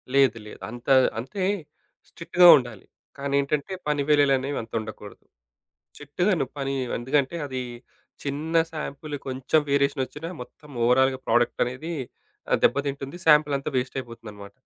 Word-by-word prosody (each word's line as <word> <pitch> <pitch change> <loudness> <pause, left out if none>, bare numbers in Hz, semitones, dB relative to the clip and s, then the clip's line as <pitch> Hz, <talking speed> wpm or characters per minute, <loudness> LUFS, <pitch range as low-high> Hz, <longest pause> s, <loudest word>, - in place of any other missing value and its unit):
లేదు 135 -5 +4
లేదు. - - -11
అంత 120 +1 -10 0.3
అంతే 135 - -4 0.7
స్ట్రిక్ట్‌గా 175 +1 +4
ఉండాలి. 120 -6 -6 0.3
కానేంటంటే 140 +4 -1
పని 150 -1 +1
వేళలనేవి 140 -1 +3
అంత 115 - -12
ఉండకూడదు. 110 -1 -10 0.7
స్ట్రిక్ట్‌గాను 155 +2 0
పని 135 -1 -2 0.2
ఎందుకంటే 135 +5 0
అది 130 -2 -4 0.6
చిన్న 150 +4 -3 0.2
సాంపిల్ 150 -1 -5
కొంచెం 130 +4 +1
వేరియేషన్ 140 -1 +2
ఒచ్చినా 155 +5 -8
మొత్తం 150 +4 -13 0.2
ఓవరాల్‌గా 130 +2 +3
ప్రొడక్ట్ 120 0 +2
అనేది 130 +8 -5 0.6
ఆహ్, - - +5
దెబ్బతింటుంది. 140 +2 0
సాంపిలంతా 150 -2 +4
వేస్ట్ 125 +1 -2
అయిపోతుందన్నమాట. 115 -5 -10
140 Hz, 120 wpm, -25 LUFS, 125-150 Hz, 0.7 s, ఆహ్